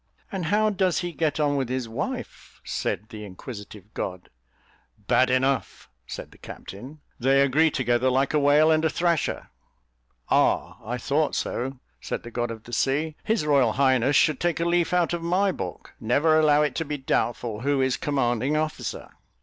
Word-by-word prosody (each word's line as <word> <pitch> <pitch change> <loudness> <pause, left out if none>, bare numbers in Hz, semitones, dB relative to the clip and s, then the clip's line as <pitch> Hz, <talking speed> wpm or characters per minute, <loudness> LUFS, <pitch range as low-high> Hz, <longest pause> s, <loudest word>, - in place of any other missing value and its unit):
"And 190 -4 -3
how 210 +5 +2
does 190 -3 +1
he 175 -1 -3
get 160 -2 -1
on 145 -1 +2
with 130 -3 -1
his 130 -2 -2
wife?" 110 - -6
said 105 - -3
the 105 -1 -8
inquisitive 105 0 -10
god. 90 -1 -5 0.7
"Bad 130 0 +2
enough," 130 - 0 0.2
said - - -7
the - - -19
captain; 130 +10 -10 0.2
"they 135 +3 +3
agree 150 +4 +3
together 125 -2 +1
like 135 +3 +1
a 150 - +3
whale 145 +2 +5
and 155 0 +3
a 160 - +3
thrasher." 170 -2 -1 0.8
"Ah! - - +1
I 120 +4 -3
thought 145 +5 0
so," 130 +2 -3 0.2
said - - -5
the 120 - -9
god 120 0 -2
of 110 -1 -7
the 120 - -12
sea. 150 +6 0
"His 220 -8 0
royal 135 -7 +3
highness 130 0 +3
should 155 -2 +4
take 175 -1 0
a 170 - 0
leaf 170 0 +2
out 175 -1 +2
of 170 - -2
my 185 +4 +2
book: 90 - -7
never 155 +8 +3
allow 150 -1 +4
it 150 -3 0
to 165 - 0
be 150 0 -3
doubtful 120 -4 -1
who 140 +3 0
is 130 -1 +2
commanding 135 0 0
officer." 155 0 -3
140 Hz, 180 wpm, -25 LUFS, 120-155 Hz, 0.8 s, whale